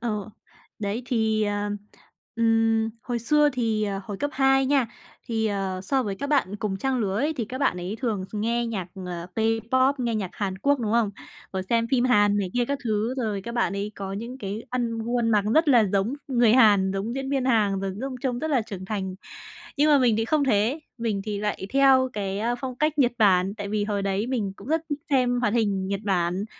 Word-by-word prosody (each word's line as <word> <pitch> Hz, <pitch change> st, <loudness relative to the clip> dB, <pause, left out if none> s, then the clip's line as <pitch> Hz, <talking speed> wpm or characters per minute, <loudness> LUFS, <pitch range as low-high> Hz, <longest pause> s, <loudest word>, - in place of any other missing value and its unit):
Ờ, 215 Hz, -3 st, -3 dB, 0.5 s
đấy 210 Hz, +3 st, -3 dB
thì, 220 Hz, -3 st, +1 dB
ờ, 205 Hz, 0 st, -1 dB, 0.7 s
ừm, 225 Hz, -1 st, +2 dB
hồi 245 Hz, -2 st, -2 dB
xưa 295 Hz, +5 st, +3 dB
thì, 225 Hz, -4 st, 0 dB
ờ, 195 Hz, -1 st, -3 dB
hồi 205 Hz, -, -5 dB
cấp 290 Hz, -, 0 dB
2 270 Hz, 0 st, +3 dB
nha, 270 Hz, -3 st, +3 dB, 0.4 s
thì, 220 Hz, -1 st, 0 dB
ờ, 195 Hz, -2 st, -2 dB
so 265 Hz, +6 st, +1 dB
với 205 Hz, -4 st, -3 dB
các 280 Hz, +9 st, -4 dB
bạn 210 Hz, -9 st, +1 dB
cùng 200 Hz, -2 st, -2 dB
trang 265 Hz, +4 st, -1 dB
lứa 195 Hz, -3 st, -1 dB
ấy, 300 Hz, +4 st, +1 dB
thì 235 Hz, -, -1 dB
các 255 Hz, +5 st, -6 dB
bạn 275 Hz, -9 st, +1 dB
ấy 180 Hz, +5 st, -4 dB
thường 215 Hz, -7 st, -1 dB
nghe 235 Hz, +3 st, 0 dB
nhạc, 205 Hz, -6 st, -3 dB, 0.2 s
ờ, 175 Hz, -1 st, -5 dB
K-pop, 230 Hz, +5 st, +2 dB
nghe 235 Hz, -2 st, 0 dB
nhạc 200 Hz, -4 st, -2 dB
Hàn 190 Hz, -2 st, -3 dB
Quốc, 280 Hz, +6 st, +2 dB
đúng 220 Hz, -2 st, -1 dB
không? 230 Hz, -3 st, +2 dB, 0.4 s
Rồi 190 Hz, -1 st, -2 dB
xem 230 Hz, +4 st, +1 dB
phim 255 Hz, -2 st, +3 dB
Hàn 205 Hz, -4 st, +4 dB
này 195 Hz, -3 st, -1 dB
kia 245 Hz, -, +2 dB
các 280 Hz, +3 st, -2 dB
thứ, 220 Hz, +2 st, 0 dB
rồi 215 Hz, -6 st, -2 dB
các 235 Hz, +2 st, -6 dB
bạn 240 Hz, -, +1 dB
ấy, 205 Hz, +2 st, -3 dB
có 195 Hz, -1 st, -5 dB
những 235 Hz, +6 st, -6 dB
cái 205 Hz, 0 st, -5 dB
ăn 235 Hz, -2 st, -1 dB
gu 235 Hz, +2 st, -2 dB
ăn 230 Hz, -, +1 dB
mặc 210 Hz, -2 st, +3 dB
rất 315 Hz, -1 st, +4 dB
là 240 Hz, -5 st, +6 dB
giống 200 Hz, +6 st, +1 dB
người 240 Hz, -4 st, +4 dB
Hàn, 205 Hz, -6 st, +5 dB
giống 205 Hz, +5 st, -3 dB
diễn 270 Hz, 0 st, -3 dB
viên 270 Hz, -2 st, 0 dB
Hàn 210 Hz, -6 st, +2 dB
rồi 195 Hz, -1 st, -2 dB
giống 270 Hz, 0 st, -4 dB
trông 250 Hz, -3 st, -1 dB
rất 315 Hz, +4 st, -2 dB
là 265 Hz, -5 st, +3 dB
trưởng 190 Hz, -3 st, -7 dB
thành. 190 Hz, -2 st, -3 dB, 0.6 s
Nhưng 295 Hz, +2 st, +4 dB
mà 290 Hz, -, +7 dB
mình 240 Hz, -4 st, +3 dB
thì 225 Hz, -, 0 dB
không 295 Hz, +3 st, +2 dB
thế, 240 Hz, +4 st, +2 dB, 0.2 s
mình 220 Hz, -4 st, -1 dB
thì 210 Hz, -2 st, -3 dB
lại 210 Hz, -2 st, -3 dB
theo 265 Hz, -2 st, +5 dB
cái, 195 Hz, -1 st, -3 dB
a, 235 Hz, +3 st, 0 dB
phong 255 Hz, +1 st, -5 dB
cách 305 Hz, +3 st, 0 dB
Nhật 250 Hz, -4 st, +4 dB
Bản, 195 Hz, -3 st, +4 dB
tại 205 Hz, -2 st, -5 dB
vì 210 Hz, 0 st, 0 dB
hồi 205 Hz, -1 st, -1 dB
đấy 195 Hz, +3 st, -1 dB
mình 220 Hz, -7 st, -2 dB
cũng 200 Hz, -, -12 dB
rất 320 Hz, +2 st, +1 dB
thích 290 Hz, 0 st, -2 dB
xem 250 Hz, -3 st, +2 dB
hoạt 210 Hz, -3 st, +1 dB
hình 200 Hz, -5 st, +1 dB
Nhật 200 Hz, 0 st, -2 dB
Bản. 185 Hz, 0 st, 0 dB
225 Hz, 230 wpm, -25 LUFS, 200-255 Hz, 0.7 s, mà